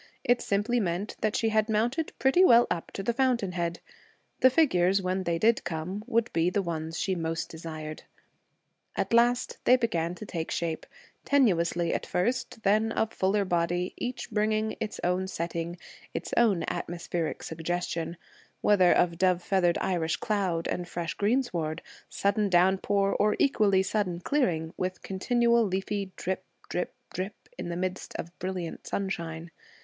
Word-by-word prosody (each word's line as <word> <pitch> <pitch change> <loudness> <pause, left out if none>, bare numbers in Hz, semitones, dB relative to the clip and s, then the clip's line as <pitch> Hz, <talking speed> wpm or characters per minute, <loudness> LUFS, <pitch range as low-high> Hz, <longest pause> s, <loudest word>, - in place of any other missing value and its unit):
It 245 0 +3
simply 210 +5 +1
meant 190 0 -2
that 215 -1 +1
she 225 - +2
had 215 0 +2
mounted 240 +9 0
pretty 270 +8 +4
well 240 -8 +7
up 170 - -2
to 195 - -4
the 235 - 0
fountain 245 -6 +1
head. 170 -1 -2 0.6
The 260 - +7
figures, 195 - +3
when 185 0 -1
they 170 -1 +1
did 225 +6 +3
come, 175 +5 -4
would 230 0 +1
be 165 +1 +3
the 195 +2 0
ones 160 -1 -4
she 190 - 0
most 165 -2 -2
desired. 155 -1 -7 0.9
At - - -1
last, 240 +2 +3
they 250 - +6
began 175 -9 -1
to 215 - -8
take 165 -5 -4
shape, 165 -2 -2 0.4
tenuously 175 -10 +2
at - - -2
first, 225 +3 -1
then 215 +3 +3
of 225 0 0
fuller 195 +2 +1
body, 175 0 0
each 245 -1 -5
bringing 215 0 +1
its 215 -1 -4
own 180 +1 +1
setting, 170 -1 -3 0.4
its - - -4
own 215 -7 +3
atmospheric 170 -1 -3
suggestion 165 0 -3 0.4
whether 190 -4 +5
of 170 -1 +2
dove 180 -2 +3
feathered 180 -3 +2
Irish 165 -3 0
cloud 190 -6 -1
and 175 -1 -3
fresh 170 -2 -3
greensward, 200 -9 0 0.3
sudden 200 +1 +1
downpour, 190 +2 +3
or 210 0 +3
equally 200 -8 +3
sudden 190 -3 -1
clearing, 175 - 0
with 185 0 -3
continual 235 +4 +2
leafy 195 0 -2
drip, 185 +1 -3 0.3
drip, 180 - -3 0.2
drip, 190 +4 -3 0.2
in - - -4
the 170 - -3
midst 185 +1 -4
of 165 - -4
brilliant 185 -3 -4
sunshine. 170 -4 -3
190 Hz, 155 wpm, -28 LUFS, 170-215 Hz, 0.9 s, well